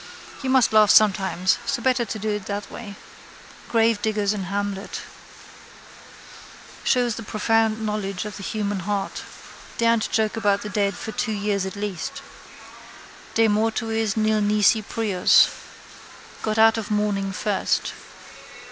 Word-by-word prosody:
You 265 - -3
must 260 -4 +3
laugh 215 -1 +6
sometimes 190 -3 +3
so 270 +1 0
better 255 0 +1
do 215 -1 -4
it 210 -2 -4
that 205 0 -5
way. 205 -4 -8 0.7
Gravediggers 215 -2 +1
in 195 -3 -4
Hamlet. 200 +1 -4 1.8
Shows 245 -2 +2
the - - -5
profound 220 0 0
knowledge 210 -1 -3
of 210 - -7
the - - -9
human 205 0 -2
heart. 195 +1 -3 0.6
Daren't 230 -1 +2
joke 220 -1 0
about 205 -3 +1
the 210 - -5
dead 200 0 0
for 220 - -6
two 220 0 -2
years 200 -2 -1
at 190 - -7
least. 200 -3 -5 1.1
De 225 0 +4
mortuis 225 0 0
nil 215 0 +2
nisi 210 +2 +3
prius. 205 -3 +3 0.9
Go 215 -1 -1
out 225 0 +5
of 220 - -6
mourning 205 -2 0
first. 200 +1 -1
210 Hz, 130 wpm, -23 LUFS, 200-225 Hz, 1.8 s, laugh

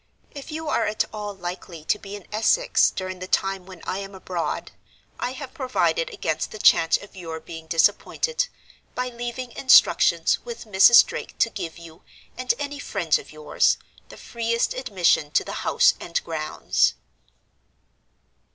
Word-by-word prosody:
If 285 +1 -9
you 315 +1 -5
are 235 -6 +1
at 215 - 0
all 210 -1 -5
likely 175 -3 -7
to 210 - +1
be 200 0 -8
in 205 - -11
Essex 225 - +3
during 185 -1 -6
the 185 - -6
time 195 -1 -1
when 185 -3 -12
I 190 - -3
am 195 0 -8
abroad, 180 -2 -4 0.5
I 250 - -2
have 265 -1 -8
provided 300 - 0
against - - -3
the - - -9
chance 165 -5 +5
of 200 - -14
your 165 -3 -6
being 160 0 -10
disappointed, 210 - +1 0.5
by 250 0 -2
leaving 240 +1 -6
instructions 260 +2 +4
with 475 - -8
Mrs. 210 +3 +7
Drake 480 -1 -7
to 230 - +2
give 175 -6 -6
you, 165 -1 -13 0.3
and 255 0 0
any 285 0 -5
friends - - 0
of - - -13
yours, 465 - +1 0.3
the - - -12
freest 235 0 -1
admission 190 - +1
to - - +3
the - - -7
house - - +4
and 170 - -3
grounds." 155 -2 0
210 Hz, 160 wpm, -24 LUFS, 180-255 Hz, 0.5 s, Mrs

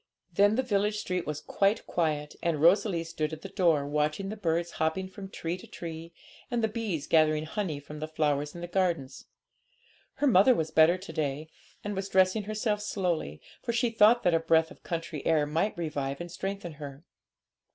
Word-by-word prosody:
Then 205 +4 +4
the 260 - +1
village 210 -3 +1
street 180 -4 -3
was 150 -1 -3
quite 200 +6 +1
quiet, 150 -3 -1
and 165 -3 0
Rosalie 175 +1 +4
stood 160 -1 -3
at 155 - -8
the 195 - -6
door, 170 -7 +2
watching 150 +6 -1
the 215 - -4
birds 170 -4 -1
hopping 160 +4 0
from 195 +1 -9
tree 170 -1 -4
to - - -12
tree, 165 0 -7 0.4
and 240 -3 -1
the - - +4
bees 215 -9 -3
gathering 155 -1 +3
honey 160 -3 -3
from 150 +1 -10
the 155 - -4
flowers 150 -1 -1
in 170 - -7
the 175 - -4
gardens. 170 -8 -1 0.9
Her 290 - 0
mother 245 0 +6
was 160 -1 -2
better 160 +3 +5
to 185 +2 -9
day, 150 +1 -2 0.3
and 205 0 -3
was 195 +1 -3
dressing 190 +2 +3
herself 215 0 -1
slowly, 175 - -2 0.2
for 235 - -2
she 235 0 +1
thought 225 +2 +5
that 175 - +3
a 165 - +4
breath 160 0 +3
of - - -14
country 165 -3 -4
air 155 -2 +3
might 165 +7 -1
revive 145 -4 -3
and 175 0 -7
strengthen 195 -1 -4
her. 145 0 -9
170 Hz, 195 wpm, -29 LUFS, 155-200 Hz, 0.9 s, mother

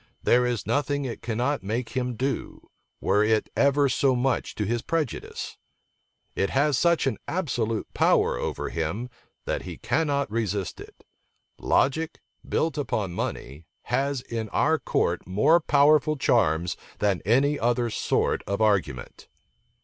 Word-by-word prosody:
There 125 0 +4
is 120 -3 -2
nothing 145 +4 0
it 120 - -5
cannot 125 +5 -1
make 115 +5 -3
him 125 -2 -2
do, 135 +4 -4 0.3
were 105 +2 +2
it 110 0 +1
ever 140 0 +3
so 130 0 +2
much 125 0 -1
to 105 - -2
his 115 +3 -1
prejudice. 160 -4 -3 0.8
It 95 - 0
has 140 +2 +2
such 170 +2 +2
an 130 -6 -1
absolute 115 - -1
power - - +3
over - - -3
him 100 +10 -3 0.3
that - - -2
he - - -8
cannot 140 -6 0
resist 105 -4 -2
it. - - -14 0.6
Logic, 160 +4 +1 0.3
built 155 -2 0
upon 110 -10 -2
money, 75 -1 -5 0.3
has 135 0 +1
in 115 -3 -5
our 160 +7 +2
court 85 0 -1
more 105 - +4
powerful 150 0 +4
charms 85 - +2 0.2
than 100 -4 +1
any 135 +8 +2
other 120 0 +1
sort - - 0
of 100 0 -1
argument." 95 - 0
120 Hz, 140 wpm, -26 LUFS, 105-140 Hz, 0.8 s, There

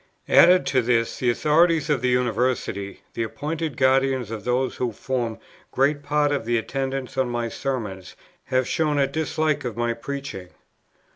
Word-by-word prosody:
"Added 180 +1 +6
to 130 - +2
this 115 -1 0
the 125 - +1
authorities 155 +5 +3
of 145 -5 +1
the 125 - +1
University, 120 -5 -1
the - - -3
appointed 150 +5 -3
guardians 130 -3 +2
of 110 -2 -6
those 125 +2 0
who 125 -2 -1
form 120 0 -3 0.3
great 145 +2 +1
part 145 0 +1
of 145 -5 -1
the 120 +1 +1
attendants 135 +2 -3
on 130 -2 +1
my 120 -1 -2
Sermons, 105 -9 -4 0.3
have 130 -1 0
shown 150 -2 0
a 140 - +4
dislike 155 0 -1
of 120 -3 -5
my 120 0 0
preaching. 125 -6 -6
130 Hz, 160 wpm, -24 LUFS, 120-145 Hz, 0.3 s, Added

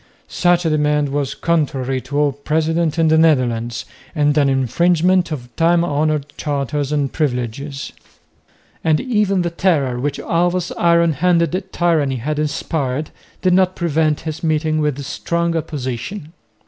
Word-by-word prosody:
Such 175 -1 +2
a - - +3
demand 150 -1 +1
was 140 -1 -2
contrary 135 -6 -1
to 140 +3 -5
all 145 -1 +3
precedent 160 +3 -1
in 165 -1 +3
the 160 0 +4
Netherlands 120 -7 +1 0.3
and 145 -1 +2
an 145 -2 +3
infringement 170 +7 +2
of 125 -6 -7
time 170 +1 +3
honoured 150 -1 0
charters 145 0 -2
and 145 -2 -1
privileges; 140 0 -3 0.9
and 155 -1 +3
even 210 -7 +1
the 170 - -2
terror, 145 -9 +1
which 140 +2 -2
Alva's 175 +1 0
iron 170 -1 +3
handed 180 +3 +1
tyranny 160 -6 +1
had 150 +5 -3
inspired, 150 -1 -2 0.3
did 185 -1 +3
not 185 0 +3
prevent 155 -3 0
his 160 0 -6
meeting 155 -1 +1
with 145 -2 -1
strong 170 +4 -1
opposition. 150 - -4
155 Hz, 140 wpm, -19 LUFS, 140-170 Hz, 0.9 s, the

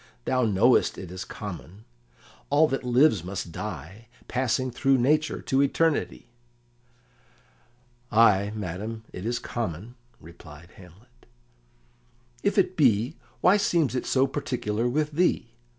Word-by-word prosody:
"Thou 130 -1 +1
knowest 110 +4 +3
it 90 -2 -8
is 90 0 -6
common; 95 - -9 0.6
all 150 +2 +4
that 135 - -2
lives 125 - +3
must 90 -2 -5
die, 95 +4 -7 0.2
passing 130 0 -1
through 135 +2 +2
nature 150 +5 +1
to 135 +1 +1
eternity." 155 +3 0 1.9
"Ay, 105 -3 +4
madam, 105 +3 -5
it 90 +4 -5
is 120 0 -1
common," 110 -1 -5 0.3
replied 80 0 -14
Hamlet. 100 +7 -18 1.1
"If 200 - 0
it 185 -1 +2
be, 125 - +2 0.3
why 185 +3 +5
seems 165 - +1
it 125 - -3
so 130 0 +3
particular 125 -5 -2
with 150 +4 -1
thee?" 155 -7 0
120 Hz, 120 wpm, -26 LUFS, 95-135 Hz, 1.9 s, why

